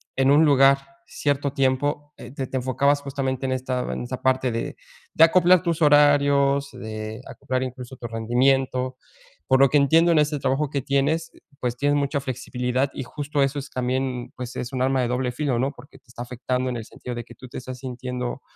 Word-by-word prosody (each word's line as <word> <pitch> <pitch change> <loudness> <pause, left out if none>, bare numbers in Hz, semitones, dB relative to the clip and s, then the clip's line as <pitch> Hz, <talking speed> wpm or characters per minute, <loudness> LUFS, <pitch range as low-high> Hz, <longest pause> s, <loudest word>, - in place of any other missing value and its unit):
en 135 +1 +3
un 150 +3 +6
lugar 135 -1 +5 0.3
cierto 140 -1 -1
tiempo, 145 +3 0
eh, - - -10
t 135 -1 -4
te 130 - -3
enfocabas 140 +3 +1
justamente, 135 -2 -3
en 130 - -1
esta 130 -1 -2
en - - -4
esta 125 +1 -6
parte 130 -1 +2
de 115 0 -4 0.4
de 160 - +6
acoplar 180 +1 +5
tus 170 -2 -1
horarios, 140 -1 +4
de 110 -2 -7
acoplar 130 0 -3
incluso 130 0 -7
tu 120 - -6
rendimiento. 130 +3 +1 0.5
Por 130 - +4
lo 135 0 +6
que 150 - +3
entiendo, 165 +5 +4
en - - +3
ese 150 0 +1
trabajo 135 +2 0
que 140 - -1
tienes, 140 +5 0 0.3
pues, 125 -2 -2
tienes 145 +2 +1
mucha 140 0 0
flexibilidad 130 0 -2
y - - -5
justo 145 +2 -2
eso 135 +1 -1
es 140 - -8
también, 130 0 -2
pues, 125 -1 -7
es 125 - -4
un 130 - -2
arma 130 0 +2
de 125 - 0
doble 125 0 -1
filo, 125 -1 -1
¿no?, 135 +3 0
porque 125 +3 -15
te - - -48
está 120 0 -8
afectando 125 +1 -2
en 120 - -3
el 115 - -7
sentido 125 - -8
de 120 0 -5
que - - -14
tú 130 - -12
te - - -8
estás 130 0 -7
sintiendo, 125 0 -5
130 Hz, 205 wpm, -24 LUFS, 125-140 Hz, 0.5 s, un